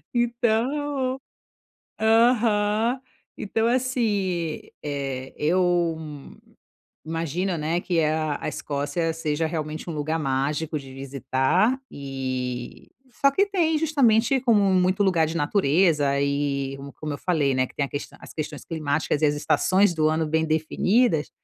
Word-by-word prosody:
Então, 255 +3 0 0.8
aham, 225 0 +3 0.4
então 225 +2 0
assim, 210 -10 0 0.2
eh, 135 -2 -4
eu 175 0 +1 1.1
imagino, 165 +3 -2
né, 160 +3 -1
que 170 -3 0
a 155 -1 0
a - - -2
Escócia 145 +3 -2
seja 160 0 -1
realmente 155 0 -4
um - - -3
lugar 155 +2 -1
mágico 150 +3 -1
de 135 -2 -7
visitar. 135 - 0
E, 130 -3 -5 0.2
só 275 - +3
que, 395 +8 +2 0.3
justamente 270 -5 +3
como 230 -5 +4
muito 185 +2 +2
lugar 170 -4 +3
de 165 - -4
natureza 145 -3 +2
e 140 -1 -1 0.2
como 155 -1 -3
eu 145 - -5
falei, 150 -7 +1
né, 130 - +2
que - - -19
tem 140 - +1
a - - -12 0.3
as - - -11
questões 155 -2 -5
climáticas 155 -1 -1
e - - +6
as 145 0 +1
estações 185 +5 +2
do 155 -1 +2
ano 160 0 0
bem 160 +1 +1
definidas, 160 +4 +1
160 Hz, 130 wpm, -24 LUFS, 145-210 Hz, 1.1 s, e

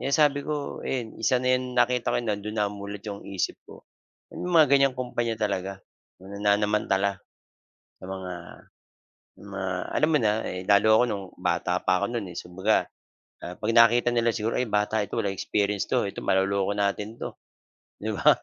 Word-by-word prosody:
kaya - - -2
sabi 145 -1 +4
ko 145 0 -4
ayan 120 -5 -4
isa 125 +3 +3
na 125 +1 +1
'yan 125 0 -1
nakita 125 0 +2
ko - - +1
nando'n 105 -2 -3
na 105 -1 +1
mulat 100 0 -7
'yong 100 -2 -6
isip 95 -2 -2
ko. - - -13 0.5
May - - -8
mga 170 -4 +4
gan'yang 135 -2 +4
kumpanya 120 -2 -2
talaga 100 -3 -1 0.4
na 100 +2 -10
nanamantala 100 -1 +1 0.8
sa - - -11
mga 95 -1 -6 1.1
sa - - -15
mga 100 -1 -5 0.3
alam 155 - +3
mo 150 - +5
na, 105 -3 +3
eh, 90 0 -4
lalo 100 +1 +5
ako - - +5
no'ng 100 -4 -3
bata 90 0 0
pa 95 +1 +1
ako - - +3
no'n 115 -5 -3
eh, 90 - -10
si - - -5
kumbaga, 95 +4 +2 0.6
ah, 90 - -6
'pag 105 +4 -4
nakita 120 +1 +6
nila 120 -1 +2
siguro 110 +1 -1
ay 125 - +1
bata 105 0 0
ito 100 - -16
walang 100 -2 -2
experience 100 0 0
'to, - - 0
ito - - -8
maloloko 95 +1 +1
natin 100 +1 -1
'to, - - -6 0.6
'di - - -4
ba? - - +2
105 Hz, 185 wpm, -26 LUFS, 100-120 Hz, 1.1 s, nakita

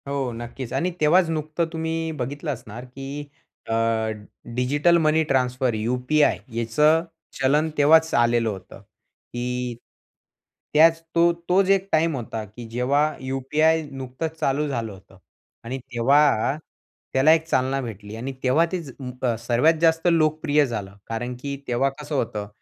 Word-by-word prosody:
हो 140 -3 -2
नक्कीच 120 +1 -7
आणि 180 +1 0
तेव्हाच 165 +3 +4
नुकतं 155 +1 -1
तुम्ही 160 0 -2
बघितलं 145 +5 -3
असणार 115 0 -9
की 135 +3 -7 0.5
अ, - - 0 0.8
डिजिटल 145 +7 +3
मनी 160 0 +3
ट्रान्सफर 125 -3 0
यू-पी-आय 125 +7 +1 0.2
याचं 150 +8 +3 0.4
चलन 150 +4 +3
तेव्हाच 160 +2 +5
आलेलं 120 -1 +3
होतं 95 -3 -9
की 125 0 -6 1.0
त्याच 165 +2 +5
तो 170 +1 +5 0.2
तोच 190 +1 +3
एक 195 0 +3
टाईम 160 0 +2
होता 115 -3 -5
की 110 +4 -11
जेव्हा 125 +5 +1 0.2
यू-पी-आय 140 +5 +1
नुकतंच 135 +5 -5
चालू 145 +2 0
झालं 115 -6 -3
होतं. 95 0 -16 0.5
आणि 125 +3 -4
तेव्हा 135 +2 +2 0.6
त्याला 135 +4 +5
एक 160 0 +1
चालना 130 -2 +1
भेटली 105 -3 -8
आणि 125 +4 -4
तेव्हा 135 +6 +4
ते 185 - -1
ज 140 - -10 0.3
अ, 120 -3 +2
सर्वात 120 +7 +3
जास्त 165 +1 +3
लोकप्रिय 155 -2 +2
झालं. 105 -6 -5
कारण 120 +2 -4
की 140 0 -4
तेव्हा 125 +3 +1
कसं 150 0 -5
होतं? 110 -5 -2
135 Hz, 140 wpm, -23 LUFS, 120-155 Hz, 1.0 s, तेव्हाच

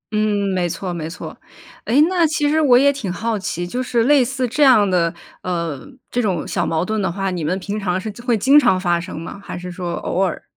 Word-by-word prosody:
嗯， 210 -2 +1
没 180 -2 0
错， 180 +1 -4
没 160 -1 -5
错。 180 - -8 0.5
哎， 250 +6 +2
那 360 -2 +1
其 300 -1 0
实 315 +2 +2
我 255 -5 +6
也 280 +2 +4
挺 220 -10 -4
好 220 +4 -2
奇， 175 -2 -3
就 245 +9 -3
是 235 -2 +1
类 275 +1 +5
似 255 0 -2
这 295 +6 -3
样 250 -7 +6
的， 170 -3 +1 0.3
呃， 170 -6 -3 0.3
这 245 - 0
种 185 -7 -1
小 175 - -1
矛 165 +2 0
盾 215 +1 -1
的 190 -3 -1
话， 195 +1 -2
你 175 -3 -3
们 180 +5 -1
平 205 +2 -4
常 185 -2 -1
是 215 +2 -5
会 240 -3 +1
经 275 +8 +6
常 240 -9 +3
发 175 -2 +1
生 165 -2 -7
吗？ 190 +4 -8
还 - - -7
是 180 0 -7
说 175 -1 -4
偶 185 - -2
尔。 185 -3 -1
200 Hz, 255 characters per minute, -20 LUFS, 175-245 Hz, 0.5 s, 我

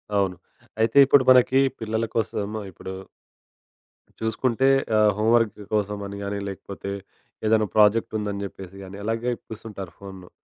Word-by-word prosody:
అవును. 95 -2 +1 0.5
అయితే 115 +5 +2
ఇప్పుడు 135 0 +5
మనకి 130 +1 +5 0.2
పిల్లల 110 +1 -1
కోసం 110 -5 -1 0.3
ఇప్పుడు... 95 +2 -8 1.3
చూసుకుంటే 120 +3 +1 0.3
ఆహ్, 105 -1 +5
హోమ్‌వర్క్ 110 -1 +2
కోసమని 100 -1 -2
గాని, 100 0 -3
లేకపోతే 100 0 -7 0.5
ఏదైనా 110 -1 +3
ప్రాజెక్ట్ 110 +1 +4
ఉందని 100 -1 -3
జెప్పేసి 95 -1 -10
గాని, 95 +1 -9
అలాగే 115 +3 -1
కూర్చుంటారు 105 -5 -8
ఫోనును. 95 -2 -11
105 Hz, 120 wpm, -24 LUFS, 100-115 Hz, 1.3 s, ఇప్పుడు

